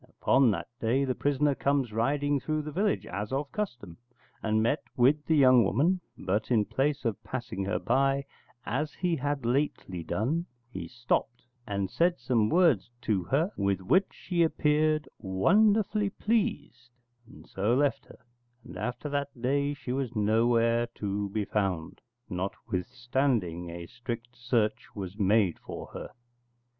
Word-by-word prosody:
Upon 135 -2 +3
that 90 -5 -2
day 125 +5 +1
the 130 - 0
prisoner 145 +2 +1
comes 135 -4 0
riding 145 +5 +1
through 155 +3 -2
the 150 - -6
village, 195 +6 0
as 105 +2 -5
of 140 +1 -2
custom, 120 - -5 0.4
and 110 0 +1
met 140 +7 +1 0.2
with 140 +5 +4
the 160 - +3
young 130 -4 +6
woman: 155 - +2 0.2
but 100 +4 -1
in 110 -4 +3
place 140 +3 -1
of 115 -3 -2
passing 120 -6 -4
her 100 - 0
by, 135 +2 +1 0.4
as 150 +5 -2
he 175 -2 0
had 145 -1 -2
lately 120 - -1
done, 150 - -1 0.2
he - - -6
stopped, 120 0 -2 0.2
and 100 -2 -1
said 175 +1 +2
some 115 -4 +1
words 160 - +3
to 100 -5 0
her 150 - +1
with 100 -2 0
which 185 - +3
she 175 -2 -2
appeared 155 -1 +2
wonderfully 205 - +3
pleased, 205 - -1 0.4
and 135 - -15
so 105 +5 0
left 140 +1 +1
her; - - -16 0.4
and 90 - -10
after 125 +8 -4
that 140 -2 -3
day 140 +3 0
she 130 - -6
was 130 -2 -2
nowhere 115 +2 +3
to 100 0 -2
be 105 +1 -2
found, 95 -7 -2 0.3
notwithstanding 100 0 -2
a 85 0 -7
strict 120 +3 -7
search 120 -3 0
was 100 0 -6
made 100 -3 +3
for - - -7
her. - - -6
125 Hz, 150 wpm, -29 LUFS, 105-145 Hz, 0.4 s, young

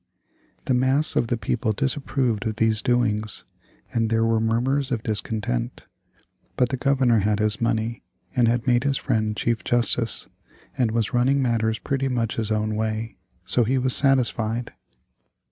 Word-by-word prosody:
The 130 - +1
mass 130 +4 +2
of 115 - +1
the 120 - -1
people 110 +1 -1
disapproved 130 -3 -1
of 110 - -2
these 110 -1 +1
doings, 110 -4 0 0.5
and 115 -1 +1
there 115 0 +2
were 115 -1 +2
murmurs 125 +5 0
of 120 -3 -2
discontent. 105 - -3 0.7
But 125 -1 +2
the 130 - -1
Governor 130 -4 +2
had 105 +1 +1
his 110 +1 0
money, 115 0 -1 0.3
and 120 -2 +3
had 120 0 0
made 120 -1 +2
his 140 -1 +1
friend 110 -1 -1
Chief 115 -1 -1
Justice, 120 -1 0 0.5
and 125 -3 +1
was 115 0 -1
running 130 +3 +2
matters 115 -3 0
pretty 135 0 -2
much 120 -4 -2
his 110 -2 -2
own 110 0 -1
way, 110 +1 -3 0.3
so 120 - +4
he 130 +4 0
was 130 0 +3
satisfied. 120 -4 +1
115 Hz, 160 wpm, -23 LUFS, 110-125 Hz, 0.7 s, so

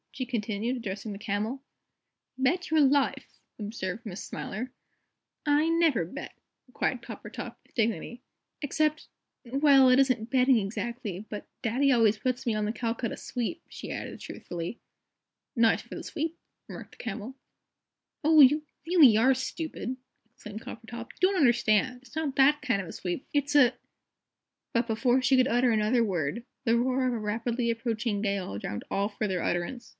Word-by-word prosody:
she 255 - -3
continued, 230 0 -2
addressing 205 -2 -5
the - - -7
Camel. 220 +5 -2 0.8
"Bet 345 +8 +1
your 315 0 +4
life!" 280 0 +1 0.2
observed 210 0 -5
Miss 195 -3 -6
Smiler. 245 +6 -5 0.7
"I 300 +2 +3
never 330 - +3
bet," 270 - -8 0.3
replied 250 0 -2
Coppertop, - - -8
with - - -30
dignity. 230 +1 -1 0.4
"Except 305 +1 0 0.4
well, 270 +1 +5
it 255 +1 +6
isn't 255 -4 +2
betting 260 -1 +4
exactly 215 -1 -4
but 210 - -6
Daddy 260 +4 +2
always 225 -4 +4
puts 255 +3 -2
me 230 - +2
on 215 0 0
the 210 - 0
Calcutta 235 0 -2
Sweep," 255 +8 -4
she - - -8
added, - - -5
truthfully. 175 +6 -6 0.8
"Nice 230 -2 +4
for - - -9
the - - -6
sweep," 320 +2 -3 0.3
remarked - - -10
the - - -10
Camel. 225 +3 -5 0.9
"Oh, 310 0 +7
you 295 +3 +6 0.2
really 315 -10 +7
are 255 +4 +5
stupid," 260 -1 -4 0.4
exclaimed 210 -2 -9
Coppertop. 230 +1 -8
"You - - -26
don't 395 - -1
understand. 245 - +3
It's 265 +3 -17
not 310 -4 -2
that 290 +2 +5
kind 250 -9 +1
of 185 - -8
a - - -7
sweep. 180 +7 -4
It's 290 0 0
a 255 -4 +6 0.5
" - - -60
But 235 0 +1
before 245 +3 +2
she 260 +1 +4
could 255 0 +4
utter 245 -1 +3
another 220 +2 +3
word 185 +1 -2 0.2
the 230 0 +4
roar 255 +2 +1
of 250 - 0
a 235 - -2
rapidly 230 +3 -1
approaching 230 -2 -2
gale 200 - -2
drowned 105 0 -5
all 200 +1 +1
further 205 -4 -2
utterance. 175 +8 -2
240 Hz, 160 wpm, -28 LUFS, 215-265 Hz, 0.9 s, Oh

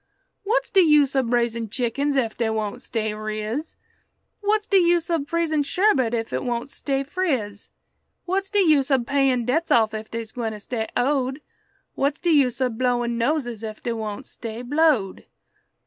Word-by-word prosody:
"What's 435 +5 0
de 390 - +5
use 300 -5 +5
ob 255 -3 +1
raisin' 235 -2 0
chickens 270 +5 -1
ef 230 -4 0
dey 230 -2 0
won't 220 +2 -3
stay 220 -4 -2
riz? 215 +7 -4 0.6
What's 420 0 +1
de 395 -3 +4
use 345 -1 +2
ob 310 -4 0
freezin' 330 -2 0
sherbet 280 - +2
ef 225 -1 -3
it - - -1
won't 240 +1 -3
stay 275 -1 -2
friz? 265 - -2 0.6
What's 390 +2 -1
de 410 0 +2
use 300 -6 +4
ob 265 -4 +2
payin' 265 -3 +2
debts 320 +7 0
off 220 -2 +3
ef 215 0 -6
dey's 230 -1 -5
gwine 225 -3 -4
stay 220 +1 -4
owed? 265 +1 0 0.5
What's 280 +2 0
de 345 - +1
use 270 -6 +3
ob 250 -3 -1
blowin' 240 -2 0
noses 240 -4 -1
ef 215 -1 -7
dey 235 - -1
won't 220 +2 -5
stay 230 +1 -7
blowed?" 280 -7 +1
255 Hz, 170 wpm, -23 LUFS, 225-305 Hz, 0.6 s, de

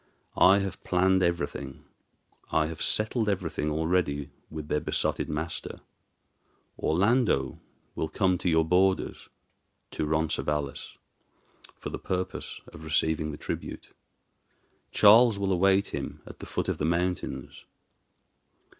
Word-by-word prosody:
I 95 +2 +6
have 95 -2 -3
planned 95 +1 +3
everything, 85 -4 -2 0.7
I 80 - +3
have 80 0 -6
settled 110 0 +1
everything 85 -6 -1
already 75 -3 0 0.2
with 80 -1 -7
their 75 - +1
besotted - - -1
master. 80 +2 -4 1.0
Orlando 95 - +2 0.3
will 80 - -3
come 90 +1 +1
to 90 - 0
your 80 -1 +3
borders 95 +3 +1 0.6
to 75 - -2
Roncesvalles 75 -2 -2 0.8
for - - -6
the - - -5
purpose 95 0 -4
of 80 - -11
receiving 80 0 +1
the 75 - -6
tribute. - - -6 1.0
Charles 110 +1 +6
will 100 -1 0
await 95 +2 +3
him - - -5
at - - -12
the - - -8
foot - - -2
of - - -2
the 75 - 0
mountains. 85 -5 -2
85 Hz, 120 wpm, -28 LUFS, 75-95 Hz, 1.0 s, I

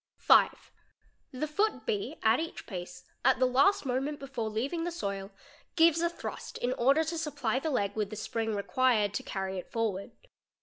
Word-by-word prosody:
| - - -65
5. - - +4 0.6
The 260 +2 -2
foot 405 +9 0
B, 410 -8 -2
at 225 +2 +4
each 325 +1 -5
pace, 180 -3 -7 0.2
at - - +5
the 260 - +3
last 275 +9 +3
moment 270 +3 -1
before 260 -5 -4
leaving 265 +10 -2
th 345 +1 -2
soil, 200 - -4 0.5
gives 330 0 +5
a 340 - +2
thrust 340 - -7
in 245 +1 -1
order 275 +6 +3
to 325 +1 -3
supply 260 -6 -1
the 315 - -2
leg 205 -8 0
with 210 -2 -1
the 215 - -6
spring 220 +1 -2
required 210 0 +2
t - - -2
carry 190 -1 -3
it - - -11
forward. 215 -4 -2
255 Hz, 185 wpm, -30 LUFS, 215-315 Hz, 0.6 s, at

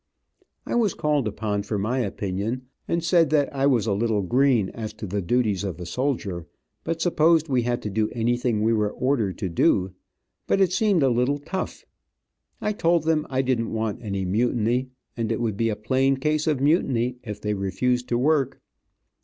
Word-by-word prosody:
I - - -4
was 225 -6 +2
called 150 -5 +1
upon 105 -1 -2
for 105 +1 -3
my 115 +6 -1
opinion, 105 +2 -2 0.2
and 170 -1 0
said 165 -3 +4
that 145 -2 +1
I 135 +1 +2
was 125 -6 +2
a 105 - +1
little 105 0 0
green 120 -1 +2
as 110 -2 -6
to 110 - -7
the 100 +1 -2
duties 105 0 +1
of 95 -4 -4
a 90 - -6
soldier, 100 - -2 0.4
but 165 0 -2
supposed 165 -2 +3
we 130 -2 +2
had 120 0 -2
to 105 - -2
do 105 +1 0
anything 120 -1 0
we 115 +1 +3
were 105 -2 +1
ordered 120 -6 -1
to 100 - -2
do, 90 +2 +2 0.5
but - - +2
it 185 -2 +3
seemed 190 -5 +3
a 135 - +4
little 125 +4 +1
tough. 160 +6 -5 0.8
I 210 - 0
told 170 -5 +2
them 160 -1 +1
I 130 0 0
didn't 120 -4 -1
want 110 -2 -2
any 100 -4 -3
mutiny, 120 +5 +1 0.3
and 115 -1 -2
it 115 - -1
would 115 -4 -1
be 115 +2 +1
a 105 - -1
plain 130 +5 +1
case 150 +3 0
of 150 -4 +1
mutiny 130 -5 +1
if 105 -3 -6
they 105 0 -1
refused 120 +6 -1
to 120 - +1
work. 135 0 +1
120 Hz, 195 wpm, -24 LUFS, 105-140 Hz, 0.8 s, said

